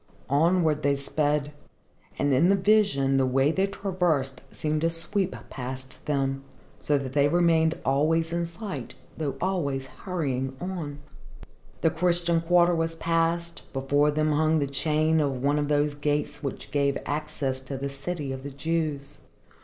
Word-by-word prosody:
Onward 160 0 +3
they 140 -1 +2
sped, 145 +1 0 0.6
and 145 -1 +2
in 160 +8 +4
the 200 - +5
vision 190 -10 +3
the 135 - +3
way 135 +3 +3
they 190 +4 +1
traversed 175 -10 -1
seemed 155 0 -1
to 165 - +2
sweep 180 +3 -2 0.2
past 130 0 -7
them, 135 -2 0 0.4
so 145 - +1
that 135 -2 -5
they 145 -1 +4
remained 165 0 +3
always 160 +4 +2
in 170 0 0
sight 190 +4 -6 0.2
though 145 -4 -2
always 145 -8 -1
hurrying 135 -5 -3
on. 175 -6 -4 0.8
The 160 - +3
Christian 170 0 +2
quarter 175 +1 +4
was 165 0 0
passed; 165 +1 0
before 145 +2 +2
them 155 +1 +1
hung 155 +1 +3
the 145 - +1
chain 155 +3 +1
of 135 -3 -1
one 145 +1 +2
of 145 - 0
those 145 0 +2
gates 145 0 -1
which 140 -4 -5
gave 140 -1 +1
access 145 -2 -2
to 135 +1 -6
the 140 +1 -4
city 140 +1 -4
of 130 0 -5
the 140 - -6
Jews. 150 -1 -3
150 Hz, 155 wpm, -26 LUFS, 140-165 Hz, 0.8 s, the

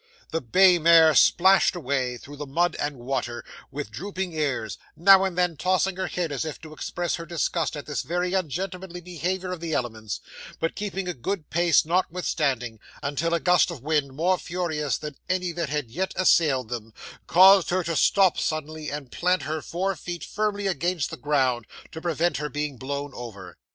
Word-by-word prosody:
'The 165 - -1
bay 180 - +5
mare 165 -1 +7
splashed 190 +7 +5
away, 130 -6 -1
through 145 +4 -11
the 145 0 -7
mud 170 +6 +1
and 145 -1 -2
water, 120 -1 -3 0.2
with 145 +2 -6
drooping 190 -2 -5
ears; 140 -8 -2 0.2
now 195 +3 +7
and 190 -2 -2
then 180 -2 +1
tossing 185 +4 +1
her 190 - -2
head 175 -3 -2
as 140 - -2
if 155 -1 -6
to 155 -1 -11
express 175 +3 -3
her 170 - -7
disgust 165 -1 -1
at 145 - -7
this 150 - -2
very 180 +2 -2
ungentlemanly 185 +1 -3
behaviour 180 +2 -3
of 180 - -4
the 165 -1 -4
elements, 110 -5 -3 0.4
but 165 - -1
keeping 195 -2 -4
a 180 - -2
good 165 +5 -4
pace 170 -2 +3
notwithstanding, 150 -9 -1 0.2
until 145 +4 -1
a - - 0
gust 180 +1 +4
of 155 -8 -8
wind, 145 -3 0
more 180 +4 +1
furious 160 -5 -2
than 150 -2 -7
any 180 -1 0
that 170 -3 -3
had 145 -5 -3
yet 185 +8 -2
assailed 145 -9 +3
them, 115 -2 -5 0.4
caused 190 0 +7
her 185 +1 +1
to 165 0 -2
stop 190 +2 +4
suddenly 155 0 -3
and 145 -3 -6
plant 180 +1 +1
her 155 +1 -3
four 190 +5 -2
feet 175 +2 -6
firmly 205 -1 -2
against 175 -4 -1
the - - -4
ground, 130 -5 0 0.2
to 160 - -8
prevent 170 0 0
her 150 0 -3
being 145 -1 -3
blown 140 +3 -5
over. 100 -8 -9
165 Hz, 185 wpm, -25 LUFS, 140-180 Hz, 0.4 s, mare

